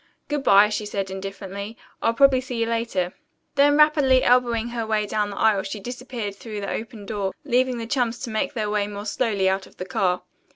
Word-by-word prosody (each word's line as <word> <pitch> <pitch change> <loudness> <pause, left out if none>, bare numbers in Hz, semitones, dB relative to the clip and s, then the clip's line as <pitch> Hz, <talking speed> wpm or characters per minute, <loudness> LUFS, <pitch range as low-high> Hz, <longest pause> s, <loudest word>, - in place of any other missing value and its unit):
"Good 295 -1 -1
bye," 205 -3 +6
she 210 0 -3
said 195 -2 -3
indifferently. 195 +2 -6 0.2
"I'll 230 0 +1
probably 270 0 +5
see 255 -1 -6
you 230 - +2
later." 230 -6 -1 0.4
Then, 290 +1 +4
rapidly 295 -4 +5
elbowing 240 -2 +3
her 235 -1 -3
way 215 -1 0
down 210 0 -1
the 200 - -7
aisle 215 -3 +3
she 195 +2 -5
disappeared 245 -2 -5
through 210 0 -7
the 200 - -3
open 220 -2 -6
door, 200 -2 -3
leaving 255 -1 +2
the 230 - -4
chums 240 -1 0
to 235 - -4
make 220 - -1
their 215 -3 -1
way 205 -1 0
more 205 0 -7
slowly 205 -3 0
out 190 0 0
of - - -21
the 185 - -5
car. 180 -1 0
220 Hz, 210 wpm, -24 LUFS, 200-245 Hz, 0.4 s, bye